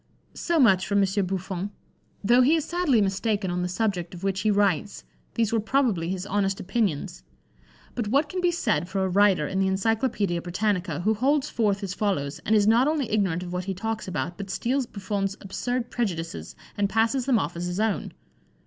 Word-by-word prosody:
So 340 Hz, -1 st, -1 dB
much 190 Hz, -9 st, +4 dB
for 200 Hz, -, -1 dB
M. 200 Hz, -, +4 dB, 0.2 s
Buffon: 190 Hz, +1 st, -3 dB, 0.5 s
though 240 Hz, +5 st, +5 dB
he 285 Hz, +6 st, +5 dB
is 315 Hz, -2 st, -1 dB
sadly 335 Hz, -10 st, +2 dB
mistaken 200 Hz, 0 st, 0 dB
on 180 Hz, 0 st, -1 dB
the 180 Hz, -, -1 dB
subject 180 Hz, -3 st, -2 dB
of 175 Hz, -, -11 dB
which 195 Hz, -1 st, 0 dB
he 215 Hz, -, +1 dB
writes, 205 Hz, -2 st, +1 dB, 0.3 s
these 230 Hz, -1 st, +1 dB
were 225 Hz, -, +3 dB
probably 220 Hz, -7 st, +1 dB
his 185 Hz, 0 st, -3 dB
honest 195 Hz, -1 st, 0 dB
opinions; 180 Hz, -, -1 dB, 0.7 s
but 235 Hz, -4 st, -2 dB
what 280 Hz, +7 st, +2 dB
can 365 Hz, +4 st, -3 dB
be 355 Hz, -, +3 dB
said 220 Hz, -, 0 dB
for 190 Hz, 0 st, 0 dB
a -, -, +1 dB
writer 190 Hz, -4 st, +3 dB
in 190 Hz, -, -2 dB
the 190 Hz, -, +2 dB
Encyclopædia 200 Hz, -2 st, 0 dB
Britannica, 180 Hz, -3 st, -1 dB
who 215 Hz, +4 st, +2 dB
holds 275 Hz, +6 st, +1 dB
forth 205 Hz, -4 st, 0 dB
as 190 Hz, -1 st, -3 dB
follows, 170 Hz, -10 st, -1 dB
and 220 Hz, -, +4 dB
is 205 Hz, -1 st, +4 dB
not 230 Hz, +5 st, +4 dB
only 300 Hz, -7 st, 0 dB
ignorant 190 Hz, -5 st, +1 dB
of 175 Hz, 0 st, -6 dB
what 180 Hz, 0 st, -3 dB
he 195 Hz, -1 st, -3 dB
talks 220 Hz, +3 st, -3 dB
about, 170 Hz, +1 st, -3 dB
but 200 Hz, -1 st, -6 dB
steals 255 Hz, +5 st, -1 dB
Buffon's 195 Hz, -1 st, -3 dB
absurd 240 Hz, +5 st, -3 dB
prejudices, 165 Hz, -, -3 dB, 0.2 s
and 200 Hz, -1 st, 0 dB
passes 230 Hz, +4 st, +1 dB
them 255 Hz, -4 st, +4 dB
off 170 Hz, -4 st, -2 dB
as 175 Hz, +1 st, -3 dB
his 180 Hz, +2 st, -3 dB
own. 220 Hz, -1 st, 0 dB
200 Hz, 200 wpm, -26 LUFS, 185-230 Hz, 0.7 s, though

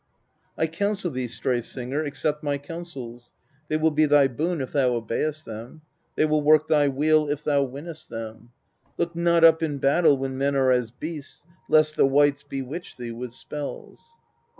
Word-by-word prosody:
128. 160 Hz, 0 st, -2 dB
I -, -, -14 dB
counsel 195 Hz, -4 st, -2 dB
thee, 130 Hz, -2 st, -3 dB
Stray 120 Hz, +1 st, -1 dB
Singer, 130 Hz, +5 st, -4 dB
accept 150 Hz, 0 st, -2 dB
my 145 Hz, -1 st, -1 dB
counsels, 135 Hz, -7 st, -9 dB, 0.3 s
they 155 Hz, -, 0 dB
will 160 Hz, +1 st, +2 dB
be 155 Hz, 0 st, +3 dB
thy 145 Hz, -1 st, +5 dB
boon 160 Hz, +7 st, -2 dB
if 130 Hz, -, -4 dB
thou 130 Hz, -4 st, +2 dB
obey'st 150 Hz, +7 st, -2 dB
them: 115 Hz, +7 st, -9 dB, 0.3 s
they -, -, +3 dB
will 155 Hz, 0 st, +2 dB
work 155 Hz, +1 st, +4 dB
thy 150 Hz, -2 st, +3 dB
weal 150 Hz, +2 st, +2 dB
if 145 Hz, 0 st, -2 dB
thou 145 Hz, -2 st, +2 dB
win'st 145 Hz, +5 st, -8 dB
them: 115 Hz, 0 st, -8 dB, 0.5 s
look 170 Hz, 0 st, -2 dB
not 170 Hz, 0 st, +3 dB
up 165 Hz, 0 st, +7 dB
in 150 Hz, -3 st, -1 dB
battle 140 Hz, +2 st, +4 dB
when 135 Hz, 0 st, -4 dB
men 140 Hz, +1 st, +1 dB
are 130 Hz, -1 st, +3 dB
as 125 Hz, -2 st, +1 dB
beasts, 150 Hz, +4 st, -8 dB, 0.2 s
lest 155 Hz, 0 st, +4 dB
the -, -, +5 dB
wights 145 Hz, +1 st, +3 dB
bewitch 135 Hz, +7 st, -7 dB
thee 120 Hz, -2 st, -6 dB
with 120 Hz, +1 st, -6 dB
spells. 150 Hz, -, -8 dB
145 Hz, 180 wpm, -25 LUFS, 130-155 Hz, 0.5 s, up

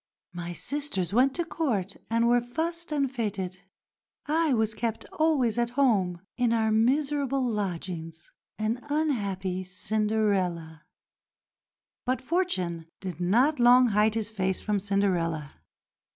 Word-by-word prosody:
My 175 Hz, 0 st, -5 dB
sisters 195 Hz, -, -2 dB
went 260 Hz, +4 st, +4 dB
to 345 Hz, -, -1 dB
Court 225 Hz, -, -1 dB
and 230 Hz, +1 st, +2 dB
were 240 Hz, 0 st, +4 dB
fussed 330 Hz, +7 st, -3 dB
and 285 Hz, -2 st, +1 dB
fêted. 205 Hz, -7 st, -3 dB, 0.7 s
I 315 Hz, +1 st, +2 dB
was 220 Hz, -3 st, +1 dB
kept 225 Hz, 0 st, -3 dB
always 270 Hz, -8 st, +2 dB
at 235 Hz, 0 st, +1 dB
home, 195 Hz, -10 st, +2 dB, 0.2 s
in 245 Hz, -2 st, +2 dB
our 220 Hz, -1 st, +2 dB
miserable 275 Hz, +3 st, +1 dB
lodgings, 175 Hz, -6 st, -4 dB, 0.3 s
an 215 Hz, +3 st, -1 dB
unhappy 200 Hz, -12 st, -1 dB
Cinderella." 185 Hz, -4 st, -1 dB, 1.2 s
But 255 Hz, 0 st, +1 dB
Fortune 195 Hz, -, -1 dB
did 185 Hz, -3 st, -6 dB
not 245 Hz, -, +3 dB
long 245 Hz, +1 st, +6 dB
hide 210 Hz, +1 st, +3 dB
his 225 Hz, -1 st, -2 dB
face 190 Hz, -3 st, -1 dB
from 210 Hz, -1 st, 0 dB
Cinderella. 180 Hz, -7 st, -1 dB
220 Hz, 125 wpm, -27 LUFS, 185-260 Hz, 1.2 s, long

